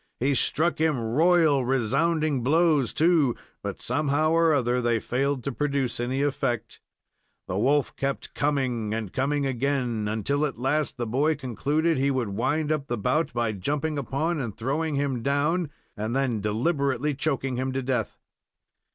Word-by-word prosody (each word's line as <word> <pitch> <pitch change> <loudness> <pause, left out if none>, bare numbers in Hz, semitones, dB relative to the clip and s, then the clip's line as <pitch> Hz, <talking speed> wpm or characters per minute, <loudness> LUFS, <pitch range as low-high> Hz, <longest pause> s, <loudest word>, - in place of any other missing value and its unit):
He 135 +3 +2
struck 155 +6 +1
him 155 -5 +2
royal, 150 +4 +3
resounding 135 +4 +1
blows, 150 -1 +3
too, 155 -7 +3 0.3
but, 100 -1 -5
somehow 145 +4 +1
or 165 0 +4
other, 125 -4 +1
they 120 -1 +1
failed 135 +2 -1
to 140 - -2
produce 140 -3 -1
any 130 +3 -1
effect. 120 -5 -2 0.7
The 95 - -2
wolf 140 +5 +2
kept 140 0 -3
coming 125 -7 0
and 110 -3 -5
coming 140 +2 0
again, 125 -4 -1
until, 110 +8 0
at 135 - -8
last, 135 +4 0
the 120 - -2
boy 140 +8 +1
concluded 145 +4 0
he 140 +1 +2
would 130 -5 -1
wind 140 +9 0
up 145 -3 -1
the 120 - -2
bout 140 +8 0
by 120 -2 0
jumping 145 +9 -2
upon, 150 +5 -1
and 115 -7 -4
throwing 145 +6 -1
him 140 -3 -1
down, 145 +5 +1 0.3
and 110 +2 -3
then 130 -6 0
deliberately 140 +5 0
choking 135 -3 -1
him 130 +1 -1
to 135 0 -2
death. 125 -5 -2
135 Hz, 160 wpm, -26 LUFS, 120-150 Hz, 0.7 s, or